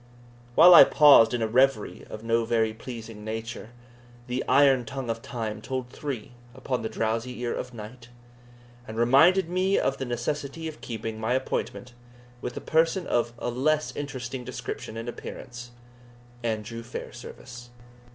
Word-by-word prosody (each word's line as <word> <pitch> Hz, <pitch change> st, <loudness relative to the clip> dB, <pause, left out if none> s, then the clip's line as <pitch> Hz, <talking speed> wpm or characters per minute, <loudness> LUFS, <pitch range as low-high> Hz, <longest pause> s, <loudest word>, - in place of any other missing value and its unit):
While 175 Hz, +3 st, +9 dB
I -, -, +12 dB
paused 145 Hz, -7 st, +7 dB
in 120 Hz, -2 st, -1 dB
a -, -, +1 dB
reverie 130 Hz, -1 st, +1 dB
of 110 Hz, -, -8 dB
no 115 Hz, 0 st, +1 dB
very 110 Hz, -1 st, +1 dB
pleasing 115 Hz, -2 st, -9 dB
nature, 110 Hz, +1 st, -6 dB, 0.6 s
the 125 Hz, +1 st, -2 dB
"iron 135 Hz, -3 st, +5 dB
tongue 130 Hz, -2 st, -4 dB
of 115 Hz, 0 st, -5 dB
time 115 Hz, -4 st, -5 dB
told 130 Hz, -2 st, -4 dB
three 130 Hz, -7 st, -6 dB, 0.2 s
upon 130 Hz, -1 st, -3 dB
the 110 Hz, -, -3 dB
drowsy 115 Hz, +3 st, -2 dB
ear 120 Hz, -1 st, -1 dB
of 125 Hz, -, -5 dB
night," 115 Hz, +1 st, -10 dB, 0.8 s
and 110 Hz, -, -7 dB
reminded 160 Hz, +10 st, +5 dB
me 185 Hz, +3 st, +1 dB
of 135 Hz, -, 0 dB
the 135 Hz, -, -2 dB
necessity 145 Hz, +5 st, -3 dB
of 155 Hz, -, -9 dB
keeping 110 Hz, -1 st, -5 dB
my 110 Hz, +2 st, 0 dB
appointment 125 Hz, -1 st, -3 dB, 0.5 s
with -, -, -5 dB
a -, -, -4 dB
person 165 Hz, +3 st, +1 dB
of 120 Hz, 0 st, 0 dB
a 120 Hz, -, -3 dB
less 155 Hz, +5 st, 0 dB
interesting 130 Hz, -3 st, -5 dB
description 115 Hz, -, -6 dB
and 115 Hz, +1 st, -6 dB
appearance 120 Hz, 0 st, -8 dB, 0.7 s
Andrew 115 Hz, 0 st, -3 dB
Fairservice. 120 Hz, +1 st, -9 dB
120 Hz, 150 wpm, -26 LUFS, 115-135 Hz, 0.8 s, I